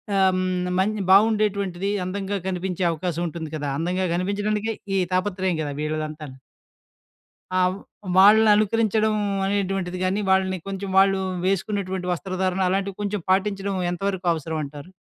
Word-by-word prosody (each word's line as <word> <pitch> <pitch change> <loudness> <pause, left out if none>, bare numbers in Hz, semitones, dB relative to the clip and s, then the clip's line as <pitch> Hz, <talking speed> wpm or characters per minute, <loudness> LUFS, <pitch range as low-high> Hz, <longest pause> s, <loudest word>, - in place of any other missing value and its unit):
ఆహ్, 190 -1 +4
హ్మ్, 185 -1 -1
మంచి 210 +2 0
బాగుండేటువంటిది. 200 -3 +3 0.2
అందంగా 195 +2 -3
కనిపించే 185 0 -2
అవకాశం 170 +1 -3
ఉంటుంది 160 -1 -6
కదా. 150 -2 -3
అందంగా 180 +4 -1
కనిపించడానికే 205 +4 -1 0.2
ఈ - - +3 0.2
తాపత్రయం 185 -1 0
కదా! 145 -2 -3
వీళ్ళదంతా. 155 0 -3 1.3
ఆ! 185 - +1 0.6
వాళ్ళననుకరించడం 215 +1 +5 0.3
అనేటువంటిది 195 -2 -1
గాని, 190 +3 0
వాళ్ళని 190 -1 +2
కొంచెం 195 0 -4
వాళ్ళు 195 0 +4 0.3
వేసుకున్నటువంటి 190 -1 -1
వస్త్రధారణ 185 +1 -1
అలాంటివి 195 0 -2
కొంచెం 205 -1 -2
పాటించడం 195 0 +1 0.2
ఎంతవరకు 190 0 -3
అవసరం 160 0 -4
అంటారు? 145 +4 -10
190 Hz, 120 wpm, -23 LUFS, 180-200 Hz, 1.3 s, వాళ్ళననుకరించడం